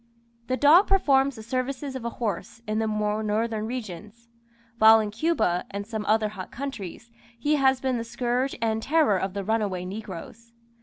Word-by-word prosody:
The 255 Hz, -, 0 dB
dog 315 Hz, +8 st, +6 dB
performs 280 Hz, -8 st, +3 dB
the 220 Hz, -, -9 dB
services 260 Hz, +3 st, -3 dB
of 260 Hz, -, -5 dB
a 235 Hz, -, -2 dB
horse 230 Hz, 0 st, -4 dB
in 215 Hz, +1 st, 0 dB
the 220 Hz, -, 0 dB
more 210 Hz, 0 st, -1 dB
northern 220 Hz, +1 st, -1 dB
regions; 220 Hz, -1 st, -7 dB, 0.5 s
while 220 Hz, +1 st, +8 dB
in 210 Hz, -1 st, -2 dB
Cuba 225 Hz, -, +1 dB
and 200 Hz, 0 st, -5 dB
some 215 Hz, -1 st, -4 dB
other 215 Hz, 0 st, +2 dB
hot 195 Hz, -3 st, -8 dB
countries, 235 Hz, -4 st, -7 dB, 0.3 s
he 295 Hz, +6 st, +1 dB
has 265 Hz, -1 st, +3 dB
been 255 Hz, -2 st, -1 dB
the -, -, -3 dB
scourge 245 Hz, +3 st, -1 dB
and 220 Hz, -1 st, 0 dB
terror 290 Hz, -, +3 dB
of 190 Hz, +1 st, -3 dB
the 200 Hz, -, -2 dB
runaway 205 Hz, -4 st, -1 dB
negroes. 220 Hz, +4 st, -8 dB
225 Hz, 175 wpm, -26 LUFS, 210-260 Hz, 0.5 s, while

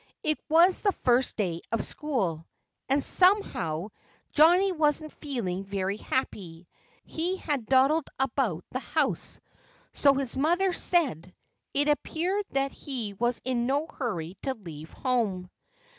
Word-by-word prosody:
It 305 Hz, 0 st, 0 dB
was 340 Hz, +4 st, +5 dB
the 405 Hz, -2 st, +2 dB
first 250 Hz, -2 st, +1 dB
day 175 Hz, -6 st, -1 dB
of 230 Hz, -, 0 dB
school. 190 Hz, -, -2 dB, 0.4 s
And 275 Hz, +1 st, +2 dB
somehow 210 Hz, -, +2 dB, 0.4 s
Johnnie 355 Hz, +6 st, +5 dB
wasn't 310 Hz, -2 st, 0 dB
feeling 215 Hz, -, -3 dB
very 195 Hz, 0 st, -2 dB
happy. 180 Hz, -10 st, -3 dB, 0.4 s
He 350 Hz, +4 st, -2 dB
had 285 Hz, -, -3 dB
dawdled 275 Hz, +4 st, +4 dB
about 235 Hz, -, 0 dB
the 255 Hz, -, -2 dB
house 295 Hz, +1 st, -1 dB, 0.5 s
so 280 Hz, -1 st, +4 dB
his 270 Hz, -3 st, -2 dB
mother 350 Hz, +7 st, +2 dB
said. 255 Hz, -, 0 dB, 0.4 s
It 290 Hz, +1 st, +2 dB
appeared 355 Hz, +7 st, 0 dB
that 275 Hz, 0 st, 0 dB
he 240 Hz, -8 st, -5 dB
was 240 Hz, +4 st, -1 dB
in 245 Hz, -2 st, 0 dB
no 285 Hz, +3 st, +1 dB
hurry 195 Hz, -, -4 dB
to 265 Hz, -1 st, -2 dB
leave 160 Hz, -6 st, -10 dB
home. 210 Hz, -9 st, -1 dB
265 Hz, 130 wpm, -28 LUFS, 195-310 Hz, 0.5 s, was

